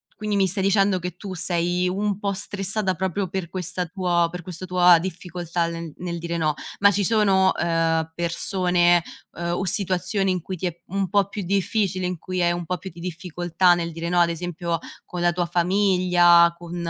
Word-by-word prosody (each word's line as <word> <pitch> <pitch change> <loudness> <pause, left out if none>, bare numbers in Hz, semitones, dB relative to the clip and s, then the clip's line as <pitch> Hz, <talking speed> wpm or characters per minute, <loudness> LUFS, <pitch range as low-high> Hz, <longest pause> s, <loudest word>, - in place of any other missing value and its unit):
quindi 210 -1 -2
mi 190 - +3
stai 190 +1 -2
dicendo 195 -1 +3
che 180 0 -6
tu 195 0 -7
sei 175 +1 0
un 200 +1 -1
po' 200 -1 -1
stressata 195 0 -2
proprio 190 +2 -2
per 185 -2 -4
questa 180 0 -3
tua 175 -1 +1
per 180 - -6
questo 180 +1 -7
tua 180 -1 +6
difficoltà 175 -1 -3
le 165 -2 -6
nel 175 -1 -4
dire 170 0 -3
"no". 155 -2 +1 0.3
Ma 200 0 +6
ci 205 +1 0
sono, 195 -2 +3
uhm, 165 -1 +1
persone, 175 0 +2 0.3
uhm, 170 0 -3
o 185 - -2
situazioni 190 +1 0
in 180 -2 -1
cui 185 - -5
ti 185 - -5
è 175 0 -7
un 195 0 -2
po' 200 +1 +2
più 205 0 -5
difficile, 195 0 0
in 180 -2 -3
cui 185 +1 -3
hai 175 - +3
un 175 0 -4
po' 180 +1 -2
più 190 - -8
di 170 - -12
difficoltà 175 0 +1
nel 170 -1 -2
dire 165 +1 -5
"no", 175 +1 +2
ad 170 - +3
esempio, 170 0 -3 0.2
con 180 - -7
la 175 0 +2
tua 175 0 0
famiglia, 175 -2 +4
con, 175 0 -8
180 Hz, 200 wpm, -23 LUFS, 170-190 Hz, 0.3 s, tua